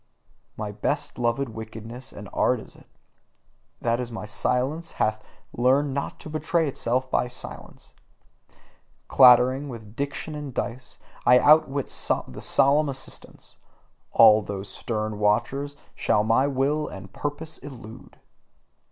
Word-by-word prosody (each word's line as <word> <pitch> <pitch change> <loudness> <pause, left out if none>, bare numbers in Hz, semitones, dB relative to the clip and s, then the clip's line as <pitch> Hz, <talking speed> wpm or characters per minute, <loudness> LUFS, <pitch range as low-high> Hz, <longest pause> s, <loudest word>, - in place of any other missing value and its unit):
My 105 -1 -4
best 105 - -3
loved 120 +3 0
wickedness 110 +2 -8
and - - -9
art - - +2
is - - -13
it, - - -19 0.9
that 120 +1 0
my 110 -2 -6
silence 135 +9 -1
hath 110 0 0 0.3
learned 135 +3 +2
not 140 +1 -4
to - - -9
betray 160 +1 0
itself 130 -1 -1
by - - +1
silence. 125 - -10 1.1
Clattering 130 +2 +6
with 110 -3 -10
diction 140 +3 -4
and 145 -4 -7
dice, 125 +2 -4 0.3
I 125 - +7
outwit 145 -1 +4 0.4
the - - -9
solemn 145 +2 +3
assistants: 135 -1 -8 0.5
all 110 -1 +7
those 100 -1 -6
stern 110 -2 -3
watchers, 120 +7 0 0.2
shall 105 - +1
my 115 +5 +3
will 145 +3 0
and 95 0 -10
purpose 150 +5 -5
elude. 120 -6 -11
125 Hz, 125 wpm, -25 LUFS, 110-140 Hz, 1.1 s, I